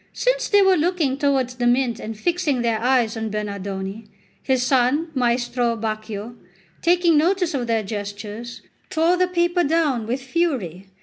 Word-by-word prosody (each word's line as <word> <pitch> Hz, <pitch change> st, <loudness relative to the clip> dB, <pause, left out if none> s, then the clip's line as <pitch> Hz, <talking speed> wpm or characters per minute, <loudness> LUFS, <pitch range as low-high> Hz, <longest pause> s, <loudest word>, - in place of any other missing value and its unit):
Since -, -, 0 dB
they 405 Hz, -1 st, +5 dB
were 380 Hz, -1 st, +4 dB
looking 320 Hz, -4 st, +1 dB
towards 270 Hz, -3 st, 0 dB
the 240 Hz, -1 st, +1 dB
mint 245 Hz, -2 st, +1 dB
and 220 Hz, 0 st, -6 dB
fixing 305 Hz, -3 st, 0 dB
their 230 Hz, -2 st, +1 dB
eyes 245 Hz, -2 st, +2 dB
on 220 Hz, -1 st, -3 dB
Bernardone, 200 Hz, 0 st, -5 dB, 0.3 s
his 260 Hz, -2 st, +1 dB
son, 265 Hz, +5 st, +2 dB
Maestro 240 Hz, -2 st, 0 dB
Baccio, 215 Hz, 0 st, -5 dB, 0.5 s
taking 340 Hz, -2 st, +4 dB
notice 360 Hz, +1 st, +1 dB
of 250 Hz, -4 st, -2 dB
their 225 Hz, -2 st, +1 dB
gestures, 210 Hz, +3 st, -6 dB, 0.3 s
tore 330 Hz, +3 st, +2 dB
the 365 Hz, 0 st, +2 dB
paper 345 Hz, 0 st, +1 dB
down 290 Hz, -8 st, +1 dB
with 250 Hz, +3 st, -1 dB
fury. 255 Hz, -, -2 dB
250 Hz, 150 wpm, -22 LUFS, 220-330 Hz, 0.5 s, they